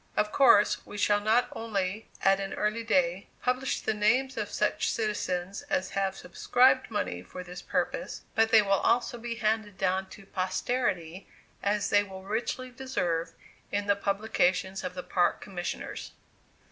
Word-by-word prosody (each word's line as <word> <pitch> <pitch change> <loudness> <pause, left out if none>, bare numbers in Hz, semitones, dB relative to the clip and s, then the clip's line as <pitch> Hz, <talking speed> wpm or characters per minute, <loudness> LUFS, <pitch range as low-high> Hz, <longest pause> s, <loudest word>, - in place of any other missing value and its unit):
Of 210 0 +2
course, 230 -6 +5
we 205 - -9
shall 205 0 +3
not 220 +4 +3
only, 210 -2 -3
at 195 0 +5
an 195 0 -4
early 215 +2 -1
day, 185 -4 +1 0.2
publish 255 +1 0
the 220 - 0
names 250 +6 +2
of 210 -2 -3
such 210 - 0
citizens 200 -4 -2
as 285 -1 0
have 195 -1 -1
subscribed 260 0 +3
money 205 - -2
for 180 - -8
this 180 0 -9
purpose, - - -2
but 225 0 +3
they 220 -2 +7
will 200 - -3
also 240 +4 +2
be 235 0 -4
handed 215 -3 -1
down 190 0 0
to 195 - -12
posterity, 185 -2 -2 0.3
as 205 0 0
they 205 - +6
will 190 -1 -10
richly 240 +5 -3
deserve, 175 -11 -2 0.4
in 205 0 -1
the 200 0 +3
publication 195 -2 0
of 180 0 -5
the 180 - -5
Park 175 -1 +1
Commissioners. 180 -3 -5
205 Hz, 160 wpm, -29 LUFS, 190-225 Hz, 0.4 s, they